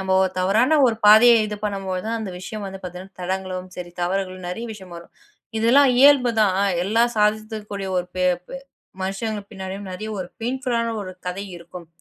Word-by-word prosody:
நம்ம 190 Hz, 0 st, 0 dB
ஓர் 190 Hz, -1 st, +1 dB
தவறான 220 Hz, +11 st, +3 dB
ஒரு 225 Hz, -2 st, +1 dB
பாதையை 230 Hz, +3 st, +8 dB
இது 210 Hz, 0 st, -5 dB
பண்ணும்போதுதான், 195 Hz, +2 st, -2 dB
அந்த 200 Hz, -4 st, -5 dB
விஷயம் 210 Hz, +3 st, -6 dB
வந்து 195 Hz, 0 st, -7 dB
பாத்தீங்கன்னா 180 Hz, +1 st, -9 dB
தடங்கலாவும் 185 Hz, 0 st, -4 dB
சரி, 175 Hz, -1 st, -7 dB
தவறுகளும் 185 Hz, 0 st, -2 dB
நிறைய 225 Hz, +6 st, -5 dB
விஷயம் 190 Hz, -4 st, -11 dB
வரும். 170 Hz, -, -13 dB, 0.5 s
இதெல்லாம் 260 Hz, +5 st, +5 dB
இயல்புதான். 245 Hz, -8 st, +5 dB
ஆ -, -, +3 dB, 0.2 s
எல்லாம் 230 Hz, +4 st, +2 dB
சாதித்தக்கூடிய 210 Hz, -2 st, -1 dB
ஒரு 180 Hz, -, -3 dB
பே 185 Hz, -, +1 dB, 0.2 s
பே 270 Hz, -, -6 dB, 0.4 s
மனுஷங்க 205 Hz, +2 st, -3 dB
பின்னாடியும் 190 Hz, 0 st, -6 dB
நிறைய 215 Hz, +4 st, -6 dB
ஒரு 180 Hz, -, -5 dB
பெய்ண்புல் 250 Hz, +1 st, -2 dB
ஆன 230 Hz, 0 st, -1 dB
ஒரு 185 Hz, -1 st, -7 dB, 0.2 s
கதை 195 Hz, +3 st, -4 dB
இருக்கும். 170 Hz, 0 st, -11 dB
200 Hz, 170 wpm, -22 LUFS, 185-225 Hz, 0.5 s, பாதையை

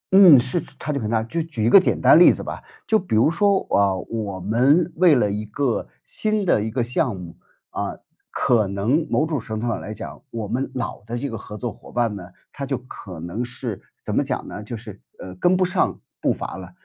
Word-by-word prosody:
嗯， 180 Hz, -9 st, +9 dB
是 130 Hz, +8 st, -1 dB
差 140 Hz, +1 st, -6 dB
距 140 Hz, -, -1 dB
很 110 Hz, -3 st, -3 dB
大。 110 Hz, -1 st, +1 dB
就 165 Hz, +9 st, -2 dB
举 150 Hz, -9 st, -3 dB
一 -, -, +4 dB
个 -, -, +10 dB
简 185 Hz, -, 0 dB
单 -, -, +7 dB
例 -, -, +9 dB
子 -, -, -4 dB
吧， -, -, -6 dB, 0.2 s
就 220 Hz, -, +3 dB
比 180 Hz, -, -2 dB
如 120 Hz, +9 st, +4 dB
说， 200 Hz, +2 st, +3 dB, 0.2 s
啊， 100 Hz, -1 st, +3 dB
我 100 Hz, 0 st, -4 dB
们 135 Hz, -, +2 dB
为 170 Hz, -4 st, +6 dB
了 105 Hz, -5 st, +2 dB
一 105 Hz, +1 st, -3 dB
个 115 Hz, -, -1 dB, 0.2 s
新 215 Hz, -2 st, -1 dB
的 110 Hz, -, +3 dB
一 110 Hz, -, -2 dB
个 120 Hz, +2 st, -1 dB
项 120 Hz, -1 st, 0 dB
目， 85 Hz, -2 st, -9 dB, 0.4 s
啊， -, -, -4 dB, 0.3 s
可 110 Hz, -4 st, +2 dB
能 115 Hz, -, 0 dB
某 155 Hz, -, +2 dB
种 155 Hz, -3 st, -2 dB
程 110 Hz, -1 st, -5 dB
度 120 Hz, -, -3 dB
上 115 Hz, -, -1 dB
来 105 Hz, -, -7 dB
讲， 110 Hz, +1 st, -8 dB
我 115 Hz, -4 st, -5 dB
们 125 Hz, +6 st, -2 dB
老 115 Hz, -5 st, -4 dB
的 120 Hz, +2 st, -4 dB
这 140 Hz, +1 st, -4 dB
个 -, -, -4 dB
合 105 Hz, -1 st, -8 dB
作 120 Hz, -1 st, -4 dB
伙 -, -, -15 dB
伴 120 Hz, -4 st, 0 dB
呢， 90 Hz, -3 st, -8 dB, 0.2 s
他 140 Hz, -, -7 dB
就 135 Hz, -1 st, -1 dB
可 100 Hz, -8 st, -10 dB
能 85 Hz, +9 st, -4 dB
是 120 Hz, -3 st, -5 dB, 0.2 s
怎 -, -, -4 dB
么 -, -, +3 dB
讲 -, -, -3 dB
呢， -, -, -7 dB
就 110 Hz, +3 st, -6 dB
是， 105 Hz, -3 st, -11 dB, 0.2 s
呃， 90 Hz, -, -9 dB
跟 180 Hz, -, +3 dB
不 185 Hz, -, +3 dB
上 180 Hz, -, 0 dB, 0.2 s
步 -, -, +2 dB
伐 -, -, -5 dB
了。 95 Hz, -, -9 dB
120 Hz, 255 characters per minute, -22 LUFS, 105-150 Hz, 0.4 s, 个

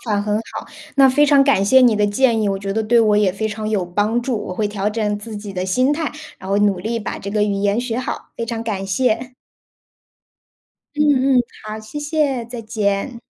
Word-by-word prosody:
法 205 Hz, -, +1 dB
很 210 Hz, 0 st, -1 dB
好。 225 Hz, -, -7 dB, 0.3 s
那 275 Hz, -1 st, +7 dB
非 290 Hz, +3 st, +4 dB
常 285 Hz, -1 st, +5 dB
感 275 Hz, -8 st, +3 dB
谢 260 Hz, +6 st, +5 dB
你 240 Hz, -4 st, +5 dB
的 210 Hz, 0 st, +2 dB
建 225 Hz, +2 st, +2 dB
议， 205 Hz, -, +1 dB
我 195 Hz, -, -1 dB
觉 195 Hz, 0 st, -4 dB
得 220 Hz, -, 0 dB
对 235 Hz, +2 st, +3 dB
我 215 Hz, -2 st, +4 dB
也 205 Hz, -3 st, +3 dB
非 220 Hz, +3 st, -2 dB
常 215 Hz, 0 st, -5 dB
有 200 Hz, -5 st, 0 dB
帮 210 Hz, +6 st, 0 dB
助， 245 Hz, -1 st, -2 dB
我 -, -, -4 dB
会 210 Hz, +2 st, -1 dB
调 205 Hz, 0 st, -2 dB
整 210 Hz, -1 st, -1 dB
自 215 Hz, 0 st, -8 dB
己 205 Hz, -1 st, -7 dB
的 185 Hz, 0 st, -2 dB
心 255 Hz, +9 st, +2 dB
态， 315 Hz, 0 st, -2 dB, 0.3 s
然 190 Hz, -, -8 dB
后 200 Hz, -, +2 dB
努 205 Hz, -3 st, +2 dB
力 225 Hz, +5 st, -2 dB
把 -, -, -5 dB
这 200 Hz, -, -6 dB
个 210 Hz, 0 st, +1 dB
语 205 Hz, -1 st, 0 dB
言 200 Hz, +2 st, +1 dB
学 245 Hz, -1 st, -3 dB
好。 255 Hz, -, -5 dB
非 230 Hz, -, -3 dB
常 230 Hz, -1 st, -4 dB
感 200 Hz, -4 st, -3 dB
谢。 245 Hz, +4 st, 0 dB, 1.6 s
嗯 275 Hz, -3 st, +3 dB
嗯， -, -, +5 dB, 0.2 s
好。 215 Hz, 0 st, -5 dB
谢 215 Hz, +7 st, -7 dB
谢， 295 Hz, -5 st, -1 dB
再 235 Hz, 0 st, -7 dB
见。 215 Hz, +2 st, -2 dB
220 Hz, 245 characters per minute, -19 LUFS, 205-250 Hz, 1.6 s, 那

